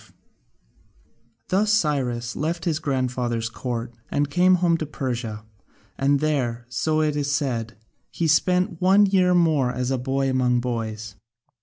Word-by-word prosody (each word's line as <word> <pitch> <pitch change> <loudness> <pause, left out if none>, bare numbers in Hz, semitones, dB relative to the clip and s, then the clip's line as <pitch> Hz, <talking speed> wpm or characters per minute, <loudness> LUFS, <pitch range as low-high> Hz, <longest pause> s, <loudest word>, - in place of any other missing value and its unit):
5] - - -22 1.4
Thus 205 +3 +2
Cyrus 130 - 0
left 165 +2 -2
his 160 -3 0
grandfather's 125 -5 -1
court 120 0 -5 0.2
and 145 0 -1
came 180 +4 +4
home 175 -1 +2
to 155 - -4
Persia, 120 -7 -4 0.5
and 140 +4 +2
there, 125 -6 -1
so 155 +6 0
it 150 -1 0
is 145 -1 -1
said, 120 -6 -2 0.3
he 170 - -3
spent 180 +3 +2
one 195 +3 +5
year 185 -2 +3
more 155 -7 +3
as 125 +1 -2
a 130 - 0
boy 135 +2 -1
among 125 -2 +2
boys. 110 -4 -4
135 Hz, 145 wpm, -23 LUFS, 120-165 Hz, 1.4 s, one